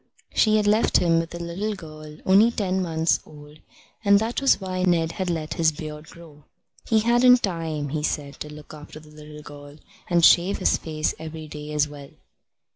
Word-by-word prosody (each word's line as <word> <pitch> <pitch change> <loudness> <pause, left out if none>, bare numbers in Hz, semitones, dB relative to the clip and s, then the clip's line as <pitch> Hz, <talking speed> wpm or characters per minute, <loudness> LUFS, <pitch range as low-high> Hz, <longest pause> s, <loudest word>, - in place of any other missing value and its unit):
She 215 -1 +3
had 210 - +1
left 210 +2 +3
him 165 -2 +2
with 165 0 -5
a - - -6
little 185 +5 -4
girl 155 -3 -11
only 200 +5 +5
ten 190 -5 -2
months 165 -2 0
old, 150 0 -15 0.4
and 200 -1 +5
that 225 +5 -2
was 275 -6 +3
why 185 -2 -4
Ned 170 -3 +1
had 185 +1 -4
let 160 -2 -3
his 160 -1 +2
beard 150 0 -9
grow. 155 -3 -16 0.4
He 220 -1 +3
hadn't 240 +2 +4
time, 160 -6 -3
he 155 +2 -3
said, 145 -2 -3
to 150 - -7
look 150 0 -12
after 150 0 -11
the 155 0 -17
little 150 0 -12
girl 145 0 -12 0.3
and 170 -2 +4
shave 180 +3 +4
his 185 - +2
face 155 -1 -3
every 160 0 -8
day 150 0 -8
as 150 0 +1
well. 145 -1 -11
165 Hz, 195 wpm, -23 LUFS, 150-190 Hz, 0.4 s, only